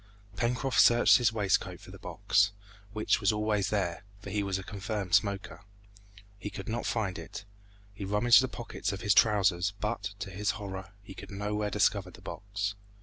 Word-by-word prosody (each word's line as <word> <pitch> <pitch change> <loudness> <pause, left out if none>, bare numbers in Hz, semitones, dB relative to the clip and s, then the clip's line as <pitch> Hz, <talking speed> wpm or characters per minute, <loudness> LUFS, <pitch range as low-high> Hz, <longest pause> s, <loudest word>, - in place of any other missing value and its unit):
Pencroft 125 +4 0
searched 120 0 +6
in - - -3
his 120 -1 +3
waistcoat 105 -4 0
for - - -13
the - - -11
box, 100 0 +1 0.4
which 110 +1 +1
was 100 - +4
always 105 -1 0
there, 95 -4 -1 0.2
for 100 -1 -8
he 105 +1 0
was 100 -1 -1
a 95 - -6
confirmed 100 -1 -4
smoker. 95 -4 +1 0.8
He 105 - -5
could 100 0 -8
not 115 +1 -2
find 100 -6 -1
it; - - -8 0.5
he 100 - -7
rummaged 105 +6 +5
the 130 - 0
pockets 120 -5 -4
of 100 - -5
his 105 - +3
trousers, 100 -3 +3
but, 105 -2 -3
to 100 -1 -6
his 100 +2 -2
horror, 95 -1 -7
he 95 - -10
could - - -10
nowhere 105 +1 -2
discover 100 -2 +1
the 90 - -15
box. 100 +1 -4
100 Hz, 185 wpm, -30 LUFS, 95-105 Hz, 0.8 s, searched